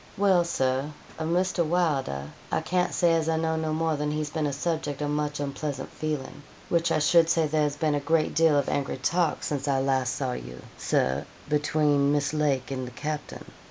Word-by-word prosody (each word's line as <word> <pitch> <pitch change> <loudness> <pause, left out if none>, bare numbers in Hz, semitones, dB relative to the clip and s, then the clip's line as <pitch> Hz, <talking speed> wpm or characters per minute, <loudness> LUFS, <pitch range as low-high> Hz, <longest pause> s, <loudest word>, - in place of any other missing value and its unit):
'Well, 190 -3 +4
Sir, 135 -3 0 0.3
of 160 0 -2
Mr. 180 0 +1
Wylder, 155 - 0 0.3
I - - +1
can't 180 0 0
say 170 -2 +3
as 165 -1 +1
I 160 - +1
know 160 0 0
no 160 -1 -1
more 160 0 0
than 150 0 -1
he's 150 0 -2
been 155 -2 -1
a - - -1
subjek 145 -1 -2
of 145 -1 -1
much 150 0 -1
unpleasant 140 -1 -4
feelin', 150 -2 -4 0.3
which 170 -1 +2
I - - +3
should 165 +2 +4
say 165 -1 +3
there 155 +1 +1
has 145 -1 +1
been 155 0 +1
a 145 - +1
great 155 +2 +1
deal 160 -2 +4
of 140 - +1
angry 140 -2 -1
talk 170 +5 0
since 145 -1 -2
I 135 -1 +2
last 130 -1 +1
saw 130 -3 -2
you, 60 - -7
Sir, 65 +2 0 0.2
between 145 -1 +2
Miss 145 0 +1
Lake 140 -4 0
and 130 -2 -3
the - - -8
capting.' 150 +3 -5
150 Hz, 205 wpm, -27 LUFS, 140-160 Hz, 0.3 s, Well